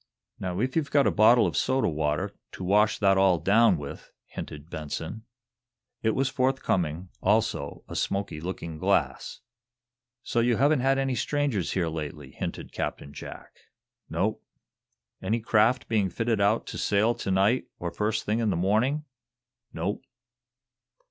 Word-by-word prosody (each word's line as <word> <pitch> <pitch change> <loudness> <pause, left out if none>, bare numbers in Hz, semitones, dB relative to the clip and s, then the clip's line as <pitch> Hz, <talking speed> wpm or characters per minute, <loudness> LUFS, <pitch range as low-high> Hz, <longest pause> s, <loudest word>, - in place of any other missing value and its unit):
"Now, 90 0 -3
if 130 +3 -1
you've 155 -4 0
got 140 -1 +4
a - - +3
bottle 115 +3 +6
of - - -1
soda 130 0 +2
water, 75 -2 -1 0.2
to - - -7
wash 105 +3 +3
that 95 -2 +3
all 95 -2 +5
down 100 +4 +4
with," 70 -1 -8
hinted 75 +1 -8
Benson. 80 +7 -6 0.8
It 110 -1 +1
was 135 0 +1
forthcoming, 95 - 0
also 105 +3 0
a - - -8
smoky 95 -6 -2
looking 85 -2 -5
glass. - - 0 0.8
"So 120 - 0
you 120 -1 +2
haven't 145 +2 +4
had 135 +2 +2
any 135 -1 0
strangers 140 - -1
here 90 -3 0
lately," 80 -2 -6
hinted - - -5
Captain 70 - -4
Jack. - - -9 0.6
"Nope." - - -1 0.8
"Any 110 +5 0
craft 115 +2 +2
been 105 -4 +1
fitting 115 +1 0
out 105 +3 +2
to - - -6
sail 105 +3 +2
to 100 - -5
night 100 +6 +2
or 85 -1 -4
first 105 +5 -1
thing 110 +2 0
in 115 -2 +1
the 95 - +1
morning?" 115 - +1 0.7
"Nope." 95 +6 -3
105 Hz, 150 wpm, -27 LUFS, 90-120 Hz, 0.8 s, bottle